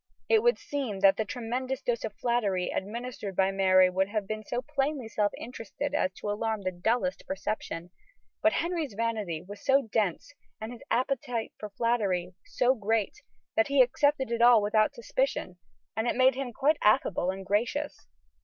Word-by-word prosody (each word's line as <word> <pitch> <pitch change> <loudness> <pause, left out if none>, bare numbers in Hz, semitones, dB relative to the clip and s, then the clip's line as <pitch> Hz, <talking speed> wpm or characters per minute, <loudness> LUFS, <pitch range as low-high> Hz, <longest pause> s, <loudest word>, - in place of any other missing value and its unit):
It 445 -1 +4
would 480 +1 +3
seem 255 -9 -4
that 195 0 +6
the 220 - 0
tremendous 255 +4 -3
dose 240 -2 -1
of 210 - -4
flattery 205 -7 0
administered 215 -1 -5
by 190 +1 +3
Mary 185 -1 +5
would 190 +2 0
have 210 -1 -2
been 215 +1 -4
so 245 +4 -3
plainly 280 -3 -1
self 210 -2 0
interested 250 +4 -5
as 185 -10 +1
to 205 - -4
alarm 215 0 -2
the 185 - -1
dullest 230 +9 -1
perception, 190 -3 -4 0.5
but 320 - +5
Henry's 330 - -2
vanity 210 -8 -2
was 205 +3 -11
so 275 +1 +4
dense, 215 - -1 0.3
and 220 +2 -6
his 245 - -10
appetite 245 -2 -1
for 210 - -6
flattery 200 -5 0
so 255 +1 +2
great, 220 -2 -1 0.3
that 220 - +3
he 280 -2 +6
accepted 265 0 +1
it 235 0 0
all 240 -1 +8
without 215 +5 +2
suspicion, 235 -6 -2 0.4
and 220 +2 -1
it - - +1
made 260 +1 +5
him 260 -1 -4
quite 290 +7 +2
affable 200 -3 +3
and 190 0 -4
gracious. 240 +9 -1
225 Hz, 170 wpm, -29 LUFS, 200-260 Hz, 0.5 s, all